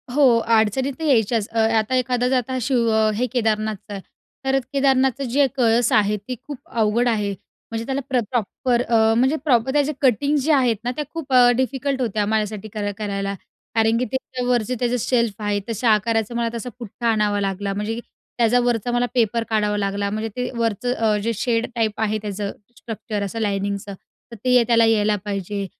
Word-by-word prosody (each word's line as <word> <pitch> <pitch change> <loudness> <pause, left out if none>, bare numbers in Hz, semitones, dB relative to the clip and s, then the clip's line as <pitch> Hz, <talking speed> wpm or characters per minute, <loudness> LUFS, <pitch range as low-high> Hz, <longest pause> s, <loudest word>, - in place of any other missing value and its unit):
हो, 285 -3 +6
अडचणी 230 +4 +2
तर 320 +5 -9
यायच्याच. 225 -5 +2
अ, 225 - -1 0.2
आता 220 +4 0
एखादं 255 0 0
शिव 235 -2 +1 0.3
हे 245 - 0
केदारनाथचं 215 -3 -1
आहे, 195 - -6 0.4
तर 270 0 +2
केदारनाथचा 270 -1 +2
जे 270 +3 +2
कळस 235 -1 +3
आहे, 210 0 +3
तो 215 +6 -7
खूप 290 -3 -6
अवघड 230 +2 +1
आहे, 210 -3 0 0.4
म्हणजे 225 0 -3
त्याला 275 +1 -2
प्र 255 -2 +2
प्रॉपर 240 +2 0
अ, 235 +4 +3
प्रॉपर 260 -3 +2
त्याचे 295 0 +2
कटिंग 280 +3 +2
जे 295 +3 +1
आहेत 250 -5 +3
ना, 245 - -1
त्या 300 - -2
खूप 295 -5 -5
अ, 245 -1 +7
डिफिकल्ट 265 +1 -1
होत्या 215 -3 0
माझ्यासाठी 215 -1 -1
करा 205 -1 -2
करायला. 200 -2 -3 0.4
कारण 225 0 +3
की 250 - 0
त्याच्यावरचे 250 -2 -1
जे 250 - 0
शेल्फ 235 -4 0
आहेत, 205 -1 -1
तशा 230 +1 0
आकाराचा 225 +1 +1
मला 235 -1 0
तसा 235 +1 -5
पुठ्ठा 235 +1 -5
आणावा 210 -2 +1
लागला, 195 0 -2
म्हणजे 210 +3 -3 0.4
त्याच्यावरचा 240 0 +2
मला 245 0 +1
पेपर 230 -1 +1
काढावा 210 -1 +1
लागला, 200 0 -1
म्हणजे 215 +2 -3
ते 250 0 -2
वरचं 230 +2 0
अ, 220 -3 +1
जे 230 +1 0
शेड 230 +1 0
टाईप 220 -2 -1
आहे 215 0 +1
त्याचं 205 -1 -4 0.3
स्ट्रक्चर 215 -2 -5
असं 200 +3 -4
लायनिंगचं 200 -1 -2 0.4
तर - - -7
ते 250 -1 +5
त्याला 230 -1 +5
यायला 215 -2 +3
पाहिजे 200 0 -3
230 Hz, 175 wpm, -22 LUFS, 210-250 Hz, 0.4 s, अ